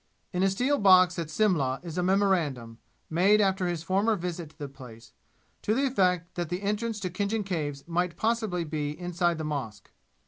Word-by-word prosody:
In 180 - 0
a 195 - +4
steel 250 +9 +1
box 185 -3 +6
at 165 -2 -4
Simla 155 -9 +1
is 165 -3 -7
a 180 - 0
memorandum, 170 - +1 0.3
made 190 +6 +4
after 190 -2 +2
his 170 -2 -3
former 200 +6 +2
visit 175 -3 -5
to 155 - -25
the 145 -3 -5
place, 115 -4 -13 0.5
to 215 - 0
the 275 +3 +2
effect 180 -9 +1
that 175 -3 -3
the 180 +3 -3
entrance 210 +2 -1
into 180 - -2
Khinjan 205 +2 -1
Caves 145 -7 -3
might 170 0 -1
possibly 220 -5 0
be 150 -1 -4
inside 175 -1 0
the 160 - -4
mosque. 140 -8 -5
180 Hz, 185 wpm, -28 LUFS, 155-200 Hz, 0.5 s, box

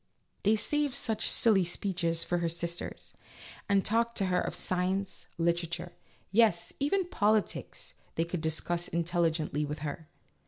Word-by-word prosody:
" - - -43
They 215 +2 +5
saved 290 +5 +1
such 220 -2 +1
silly 210 -5 +4
speeches 170 -2 -1
for 175 - 0
her 170 -1 0
sisters, 170 +1 -4 0.6
and 200 -1 +3
talked 230 +2 +1
to 195 - +2
her 180 - +3
of - - -3
science, 185 +2 -1
literature, 170 +1 -1 0.4
yes, 210 -5 +3
even 360 +7 +2
politics 215 - 0 0.2
they 165 - +1
could 170 -1 -3
discuss 170 +2 -1
intelligently 165 -3 0
with 150 +1 -3
her. 150 +2 -5
175 Hz, 145 wpm, -30 LUFS, 170-210 Hz, 0.6 s, They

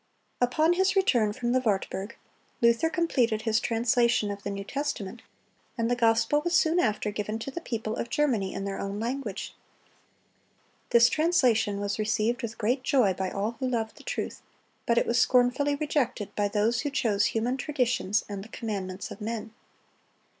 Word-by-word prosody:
Upon 310 +7 +3
his 380 +2 +2
return 245 - +3
from 240 +3 -2
the 255 - +3
Wartburg, 205 -2 -2 0.4
Luther 235 +7 +3
completed 245 -10 +1
his 225 -1 +2
translation 235 -2 +2
of 200 0 -6
the 200 - -4
New 200 0 -4
Testament, 240 -4 -4 0.6
and 230 0 0
the - - +3
gospel 230 +4 +3
was 345 +2 0
soon 330 +2 +3
after 215 -5 0
given 210 +1 -3
to 225 +4 -6
the 340 - -5
people 225 -6 -3
of 235 - -4
Germany 235 -11 +1
in 195 - -4
their 195 -1 -4
own 200 +1 -4
language. 255 +5 -4 1.4
This 235 -1 +6
translation 250 - +2
was 205 +1 -2
received 220 +3 0
with 230 -2 -5
great 245 +5 0
joy 255 -8 +3
by 185 +1 -3
all 210 +5 -3
who 260 - -1
loved 225 -3 -2
the - - -14
truth; - - -4 0.5
but 235 - +2
it - - +3
was 235 0 +2
scornfully 255 +3 +3
rejected 285 -9 -1
by 205 -1 +1
those 210 +3 +1
who 290 - -2
chose 215 -7 +1
human 235 +3 0
traditions 250 -7 0
and 200 -1 -6
the 220 - -13
commandments 195 -5 -5
of - - -9
men. 220 0 -4
230 Hz, 175 wpm, -27 LUFS, 210-260 Hz, 1.4 s, This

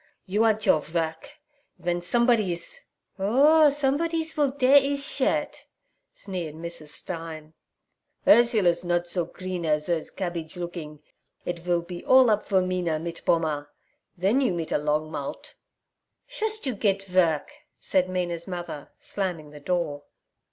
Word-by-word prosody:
You 205 +4 +2
ant 220 -1 +2
your 155 - +4
vork. 160 +1 -3 0.5
Ven 175 0 -2
somesbodies—' 210 -3 +1 0.4
'Orh, 290 +10 +5
somesbodies 315 +3 0
will 295 -3 +3
dare 270 +1 +6
ees 280 0 -1
shirt' - - -1 0.5
sneered 175 -6 -6
Mrs. 170 -1 -5
Stein. 160 -1 -6 0.7
'Urzler's 215 -7 +5
nod 175 0 +1
so 175 -1 -2
kreen 185 -1 -5
as 150 -1 +1
hers 170 -3 -1
kabbidge 175 -2 -5
lookin'. 160 -4 -7 0.4
It 175 -1 -3
vill 175 0 0
be 175 0 -8
all 260 -3 +6
up 210 0 0
for 190 -2 +3
Mina 180 -3 -1
mit 170 +1 -6
Pommer. 155 -3 +1 0.5
Then 200 +10 +2
you 245 -10 +1
mit 165 -2 -4
a - - +2
long 150 +1 -1
mout'.' 140 -3 -6 0.7
'Shust 440 -5 -2
you 260 - 0
get 200 -2 0
vork' 180 - +1 0.3
said 185 -1 +1
Mina's 175 -2 -2
mother, 175 -5 -6
slamming 175 -7 -3
the 150 - -11
door. 155 -3 -1
180 Hz, 140 wpm, -26 LUFS, 165-220 Hz, 0.7 s, dare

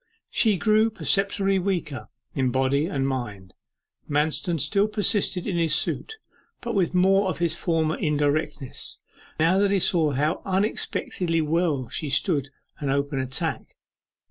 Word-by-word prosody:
She 215 -4 +3
grew 215 +5 +3
perceptibly 195 -2 +1
weaker, 175 -8 -3 0.2
in 130 -2 +1
body 135 +4 +1
and 135 -8 -1
mind. 105 -8 -5 0.6
Manston 155 +3 0
still 200 +7 +2
persisted 205 -3 0
in 190 -5 -1
his 165 -2 +3
suit, 440 - -1 0.4
but 235 -1 -4
with 185 -4 +1
more 190 +2 +4
of - - -3
his 170 -2 0
former 165 -3 0
indirectness, 145 -2 -1 0.4
now 170 +5 +4
that 200 0 +3
he 200 - +3
saw 165 -5 +2
how 150 +6 0
unexpectedly 185 -3 -1
well 155 -4 0
she 150 +5 -4
stood 140 0 +1 0.3
an 145 - -2
open 140 0 0
attack. 130 0 -3
165 Hz, 140 wpm, -25 LUFS, 145-195 Hz, 0.6 s, more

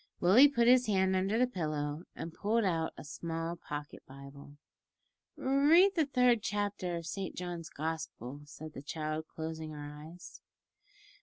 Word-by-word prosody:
Willie 215 +11 +7
put 235 -5 +2
his 250 0 +6
hand 190 -2 +2
under 195 +4 +1
the 250 - +4
pillow 155 -7 -3
and 165 - -6
pulled 225 +5 +1
out 165 -4 0
a - - -8
small 165 +2 -4
pocket 145 -3 -7
Bible. 140 +1 -12 0.8
"Read 300 +8 +5
the 320 -6 +1
third 250 -4 +3
chapter 205 -4 -2
of 170 -1 -5
Saint 195 +2 -4
John's 175 -2 -5
Gospel," 150 -4 -5
said 155 +1 -10
the 135 - -7
child, 155 +1 -4
closing 160 0 -6
her 145 0 -7
eyes. 160 +4 -11
170 Hz, 150 wpm, -32 LUFS, 155-215 Hz, 0.8 s, Willie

